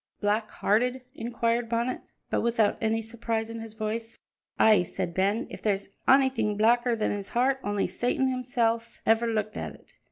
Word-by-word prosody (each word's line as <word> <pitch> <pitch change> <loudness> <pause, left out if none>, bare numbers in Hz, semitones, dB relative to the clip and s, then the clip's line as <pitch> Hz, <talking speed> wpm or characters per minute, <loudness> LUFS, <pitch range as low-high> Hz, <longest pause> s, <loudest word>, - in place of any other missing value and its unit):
"Black 215 +1 0
hearted?" 250 +5 +1
inquired 235 -2 -1
Bonnet, 235 +2 -1 0.3
but - - +1
without 230 -3 +2
any 225 0 +1
surprise 225 0 -3
in 230 - -6
his 225 -1 -9
voice. 225 +1 -4 0.4
"Ay," 215 -3 +6
said 180 0 -4
Ben, 200 +5 +1
"if - - -8
there's 200 -2 -1 0.2
onything 260 -6 +3
blacker 235 +2 +3
than 220 - 0
his 200 -1 -4
heart, 260 +2 +2
only 205 -1 0
Satan 250 +2 0
himsel' 245 -3 0 0.2
ever 225 +1 +3
looked 215 -2 -1
at - - -5
it. - - -22
225 Hz, 165 wpm, -27 LUFS, 215-240 Hz, 0.4 s, Ay